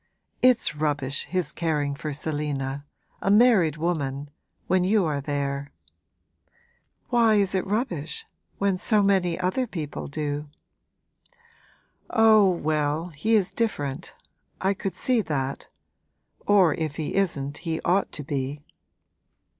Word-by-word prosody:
It's 250 -10 +4
rubbish, 145 -2 -1
his 180 -2 -1
caring 150 -4 -1
for 150 +1 -5
Selina 145 -2 -3 0.4
a - - 0
married 205 - +5
woman 145 -4 -2 0.3
when 185 -1 +2
you 200 0 +3
are 145 -3 -1
there.' 140 0 -3 1.4
'Why 230 -3 +4
is 200 -2 +2
it 190 0 -1
rubbish 190 - -2 0.3
when 195 -2 +1
so 210 +2 +2
many 185 -4 +2
other 185 +8 0
people 155 -8 -5
do?' 145 0 -4 1.6
'Oh, 220 -4 +6
well, 155 -1 -1
he 180 +9 0
is 195 -4 +2
different 150 - -3 0.4
I 190 +1 +1
could 190 -2 -4
see 250 +2 +2
that; 140 -6 -3 0.8
or 190 -6 +5
if 155 -3 -3
he 155 -2 -3
isn't 150 -8 0
he 165 -2 -3
ought 190 +3 +1
to 150 - -5
be!' 140 +1 -4
160 Hz, 120 wpm, -25 LUFS, 145-195 Hz, 1.6 s, Oh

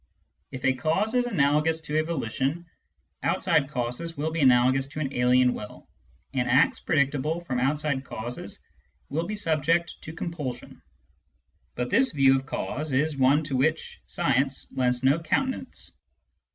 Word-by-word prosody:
If 130 -1 -6
a 130 - +4
cause 160 - 0
is 245 -1 +2
analogous 150 -3 +2
to 155 0 -1
a - - +1
volition, 155 +1 -2 0.6
outside 135 - +1
causes 130 +5 -4
will 155 +2 -1
be 165 0 -2
analogous 130 +1 +4
to 140 - -7
an 140 -2 -3
alien 125 0 +3
will, 105 - -9 0.5
and 125 -2 0
acts 130 +3 +4
predictable 145 +2 0
from 130 -8 -3
outside 140 +1 0
causes 120 -2 -5 0.5
will 160 +4 -2
be 215 - -3
subject 165 -2 +1
to 160 - -7
compulsion. 150 -7 -6 0.9
But 125 0 -3
this 260 +2 +3
view 135 -2 +5
of 135 0 -3
cause 150 +2 -3
is 150 +3 +1
one 135 +3 +3
to 145 -3 -2
which 155 +5 0
science 135 -5 0
lends 125 -1 0
no 140 +5 +4
countenance. 260 - -2
140 Hz, 150 wpm, -26 LUFS, 130-160 Hz, 0.9 s, view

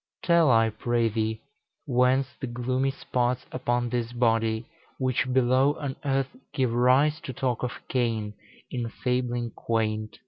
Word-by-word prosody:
Tell, 170 -4 +4
I 115 -2 +4
pray 115 +1 0
thee, 110 +1 -2 0.4
whence 130 0 +2
the 135 - -4
gloomy 125 +3 -1
spots 125 -2 -1
Upon 120 -1 -1
this 120 -1 -2
body, 115 -1 +1 0.3
which 130 0 0
below 130 +3 +3
on 140 -2 -3
earth 135 - 0 0.2
Give 130 -4 +1
rise 130 +6 +4
to 130 - -6
talk 125 -1 -1
of 125 - -2
Cain 115 -4 -1 0.4
in 120 -2 -3
fabling 120 -1 -1
quaint?" 110 -1 -2
125 Hz, 140 wpm, -27 LUFS, 115-130 Hz, 0.4 s, Tell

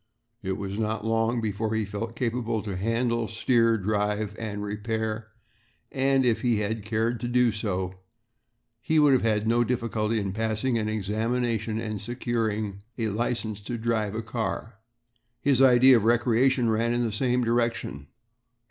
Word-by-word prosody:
It 95 - -2
was 100 +1 -4
not 110 0 -2
long 115 +1 +1
before 110 +1 -2
he 110 -1 0
felt 105 +3 -5
capable 115 -3 -1
to 100 -3 -4
handle, 115 +3 0
steer, 115 0 +2
drive, 105 +1 -1
and 105 -2 -4
repair, 110 +1 -3 0.6
and, 135 -1 +2
if 120 -3 +2
he 120 -3 +2
had 110 +1 -2
cared 115 +2 -1
to 120 - -3
do 125 -1 +3
so, 95 -4 -2 0.9
he 160 +6 +1
would 150 -2 +6
have 130 - +3
had 110 -1 +1
no 120 +1 +3
difficulty 115 -2 -1
in 100 -2 -3
passing 110 +3 -1
an 110 -1 -1
examination 110 +2 -1
and 110 -3 -4
securing 110 -3 -2 0.2
a 110 -2 -1
license 110 -1 -2
to 120 +4 -4
drive 110 -2 -1
a 115 - -3
car. 110 0 -4 0.6
His 135 -1 +2
idea 130 0 +7
of 110 - -1
recreation 120 +2 +3
ran 115 +1 +1
in 120 0 +1
the 115 - -1
same 125 +3 +1
direction. 115 -11 -1
115 Hz, 155 wpm, -26 LUFS, 105-120 Hz, 0.9 s, idea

